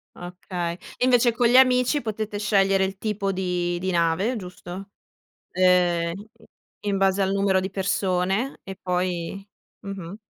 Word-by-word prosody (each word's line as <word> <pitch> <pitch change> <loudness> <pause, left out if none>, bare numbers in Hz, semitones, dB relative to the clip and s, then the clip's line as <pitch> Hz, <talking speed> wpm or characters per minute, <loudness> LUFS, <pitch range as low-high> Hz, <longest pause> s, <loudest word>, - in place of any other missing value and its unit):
Okay, 175 -1 -5 0.3
e 250 - +3
invece 245 -1 +4
con 240 +1 +2
gli 240 - +3
amici 255 +2 +5
potete 215 -1 -3
scegliere 195 -2 +2
il 190 0 -3
tipo 205 -2 -1
di 180 -2 -1
di 185 +1 -2
nave, 175 +7 +1
giusto? 185 0 -8 0.6
Ehm, 175 -2 +3 0.7
in 200 -1 -1
base 195 0 +2
al 190 - 0
numero 195 -1 +2
di 190 0 -4
persone 190 +4 -1
e 190 -1 -8
poi 180 +1 -2 0.4
mh-mh. 195 -1 -7
190 Hz, 140 wpm, -24 LUFS, 180-205 Hz, 0.7 s, amici